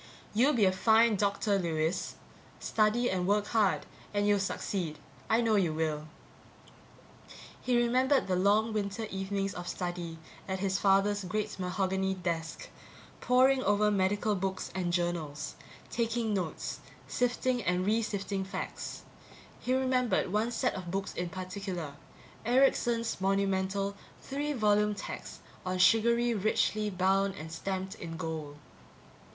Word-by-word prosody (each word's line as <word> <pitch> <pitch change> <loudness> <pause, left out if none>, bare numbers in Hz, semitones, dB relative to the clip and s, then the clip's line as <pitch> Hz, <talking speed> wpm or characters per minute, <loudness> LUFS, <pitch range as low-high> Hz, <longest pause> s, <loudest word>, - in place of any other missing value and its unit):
"You'll 255 +8 +4
be 220 -5 +4
a 185 - +5
fine 220 +3 +4
doctor, 200 0 +1
Lewis. 165 0 -1 0.4
Study 220 +3 +2
and 185 -3 0
work 205 +1 +2
hard 210 -4 +2 0.3
and 205 0 +2
you'll 205 -1 +4
succeed. 185 -4 -2 0.3
I 225 +2 +4
know 225 -2 +3
you 170 -6 +1
will." 155 -1 -1 1.5
He 250 -1 +2
remembered 255 +3 +3
the 185 - 0
long 210 +4 +3
winter 205 +1 -2
evenings 195 0 -2
of 175 0 -6
study 175 -2 -4 0.3
at 190 -1 -1
his 190 -1 0
father's 200 +1 +3
great 210 +2 -3
mahogany 190 +1 0
desk, 170 -3 -4 0.5
pouring 260 +1 +4
over 210 -1 +3
medical 205 +2 +1
books 190 -1 -3
and 180 -2 -1
journals, 170 -4 -2 0.4
taking 230 -1 0
notes, 180 -5 -3 0.3
sifting 245 0 0
and 180 -1 0
re 220 +3 +2
sifting 200 -2 -2
facts. 190 - -5 0.6
He 255 - 0
remembered 250 -7 +1
one 215 +3 +2
set - - 0
of 185 -2 -6
books 195 +2 -3
in 175 0 -3
particular 185 -4 -5 0.5
Erickson's 235 -3 +2
monumental 195 0 0 0.2
three 290 +2 -3
volume 210 -3 +2
text - - -7 0.2
on 185 0 -2
surgery, 235 +5 +4
richly 215 0 +1
bound 195 +1 +1
and 160 +1 -8
stamped 190 +3 -3
in 165 -6 -7
gold. 160 -4 -5
195 Hz, 135 wpm, -31 LUFS, 185-220 Hz, 1.5 s, a